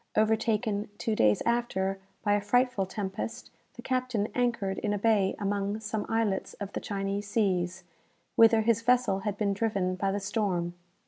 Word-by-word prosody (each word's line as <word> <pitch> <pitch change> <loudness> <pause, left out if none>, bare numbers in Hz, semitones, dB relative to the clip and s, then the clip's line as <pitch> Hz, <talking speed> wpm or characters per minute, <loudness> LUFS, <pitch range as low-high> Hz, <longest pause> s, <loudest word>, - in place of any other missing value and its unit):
Overtaken, 220 -1 +1
two 220 - -1
days 105 - +3
after, 195 -5 0 0.2
by 205 - +3
a 205 - +2
frightful 245 -1 +2
tempest, 110 - -5 0.2
the 240 - -10
captain 255 -5 -1
anchored 235 -6 0
in 205 -1 -1
a - - 0
bay 205 -2 +2
among 200 +1 -1
some 215 -1 -3
islets 225 -4 0
of 200 -1 -7
the - - -2
Chinese 200 0 -3
seas, 190 -4 0 0.5
whither 225 -1 +6
his 230 0 +2
vessel 245 -5 +3
had 205 0 -3
been 200 -1 +1
driven 195 -3 0
by 195 +1 -1
the 200 - -1
storm. 195 -4 -1
205 Hz, 165 wpm, -29 LUFS, 195-225 Hz, 0.5 s, whither